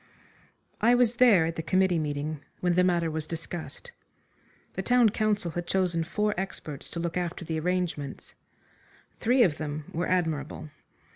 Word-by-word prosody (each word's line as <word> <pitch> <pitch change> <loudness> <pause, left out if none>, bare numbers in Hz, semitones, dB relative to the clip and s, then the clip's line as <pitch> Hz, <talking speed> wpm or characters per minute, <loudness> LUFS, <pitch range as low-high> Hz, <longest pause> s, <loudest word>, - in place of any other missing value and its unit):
I 235 +3 +5
was 245 -1 +3
there 215 -10 +6
at 165 0 -3
the - - -1
committee 180 +1 +2
meeting 150 0 -3 0.2
when 180 -1 +1
the 180 +1 +4
matter 170 -3 +2
was 155 0 -3
discussed. 170 - -6 0.8
The - - -2
town 245 -2 +4
council 210 -4 0
had 175 +2 -4
chosen 180 -3 +1
four 210 +5 0
experts 155 -7 -5
to 170 - -5
look 170 +1 -2
after 175 -1 -3
the 160 0 -2
arrangements. 175 -5 -2 0.9
Three 245 +2 +4
of 160 -7 +1
them 150 -1 -5
were 175 +2 -1
admirable. 155 -4 -1
175 Hz, 155 wpm, -28 LUFS, 160-190 Hz, 0.9 s, there